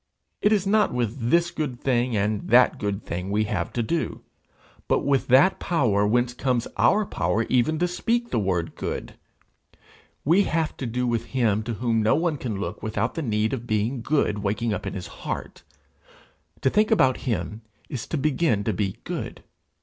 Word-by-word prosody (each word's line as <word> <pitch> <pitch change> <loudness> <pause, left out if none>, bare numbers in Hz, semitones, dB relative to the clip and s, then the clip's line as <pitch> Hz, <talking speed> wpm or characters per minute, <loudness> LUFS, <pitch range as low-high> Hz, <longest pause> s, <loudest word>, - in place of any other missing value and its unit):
It 210 - +3
is 205 -3 +2
not 210 +2 +3
with 120 0 -2
this 170 +2 +3
good 135 -6 -3
thing 125 -3 +1
and 105 +1 -1
that 125 +2 +5
good 100 0 -2
thing 90 +3 -4
we 105 +2 +1
have 85 -5 -2
to 120 - 0
do, 165 +8 -2 0.7
but - - +1
with 140 -2 +2
that 135 +10 +5
power 110 - +2
whence 120 +2 +1
comes 125 -2 0
our 210 +1 +3
power 90 - 0
even 130 +5 +2
to 180 - +1
speak 235 +7 -1
the - - +1
word 90 -4 -1
good. - - -4 1.1
We 175 +7 +4
have 160 -1 -1
to 130 - -4
do 125 +2 -1
with 115 -1 0
him 110 -4 +2
to 115 -1 -3
whom 115 -1 +1
no 110 - +3
one 160 -1 0
can 110 -7 -4
look 100 - -5
without 110 +2 -1
the 165 - -3
need 110 -4 0
of 120 -2 -4
being 110 +4 0
good 125 -6 +1
waking 105 +3 -1
up - - -4
in - - -4
his 90 -2 -5 0.2
heart; - - -5 1.0
to 130 - +2
think 210 +1 +3
about 130 - +4
him 105 +1 -2 0.3
is 130 - -5
to 160 - -2
begin 135 -6 +1
to 110 - 0
be 100 -3 -2
good. - - -5
120 Hz, 190 wpm, -25 LUFS, 105-150 Hz, 1.1 s, that